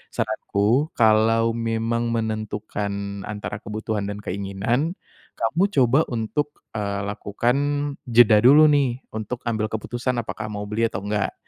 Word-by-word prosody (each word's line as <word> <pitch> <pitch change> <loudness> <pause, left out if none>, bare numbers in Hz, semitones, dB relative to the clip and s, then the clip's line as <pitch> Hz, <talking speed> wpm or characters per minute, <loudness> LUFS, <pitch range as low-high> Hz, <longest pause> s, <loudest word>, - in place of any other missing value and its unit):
Saranku, 110 +6 +1
kalau 115 +1 +4
memang 115 0 -1
menentukan 105 -3 -3
antara 105 0 -5
kebutuhan 105 -1 -3
dan 105 0 -5
keinginan, 100 - -1 0.4
kamu 155 - +1
coba 130 +1 +4
untuk, 145 +6 -2 0.2
eee, 100 -1 -2
lakukan 110 +5 -1 0.5
jeda 115 -3 +6
dulu 145 +7 +7
nih, 135 -4 +2 0.2
untuk 110 +3 -5
ambil 110 -1 0
keputusan 120 +4 -3
apakah 110 0 -6
mau 105 -1 -5
beli 115 +2 +1
atau 95 -4 -3
enggak. 105 -1 -1
110 Hz, 125 wpm, -23 LUFS, 105-120 Hz, 0.5 s, dulu